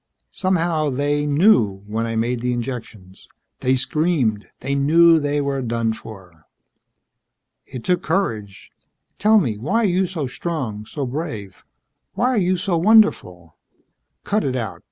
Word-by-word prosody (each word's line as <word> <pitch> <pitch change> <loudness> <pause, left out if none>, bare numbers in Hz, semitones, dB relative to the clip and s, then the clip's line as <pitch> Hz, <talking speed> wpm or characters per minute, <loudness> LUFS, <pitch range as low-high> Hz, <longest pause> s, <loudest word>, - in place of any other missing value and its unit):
Somehow 170 -5 0
they 145 +2 -1
knew 140 - +3
when 110 +2 -2
I 115 - -3
made 120 +2 -1
the 125 0 -1
injections. 115 -6 -7 0.3
They 130 +1 +2
screamed. 135 -7 0
They 135 +2 -2
knew 165 +4 +5
they 145 0 -1
were 140 -1 -2
done 115 -2 -1
for." 95 -8 -13 1.2
"It 125 -3 -8
took 180 +5 +1
courage. 110 - -3 0.5
Tell 215 +1 +5
me: 115 - 0
why 205 - 0
are - - +3
you 185 0 +1
so 165 -5 -4
strong, 125 -7 -5
so 140 +2 -4
brave? 120 - -6 0.5
Why 245 - +1
are 255 - 0
you 185 -1 +1
so 175 -1 0
wonderful?" 165 - +3 0.7
"Cut 210 +1 0
it 130 -2 -1
out. 115 -6 -4
140 Hz, 145 wpm, -21 LUFS, 110-170 Hz, 1.2 s, knew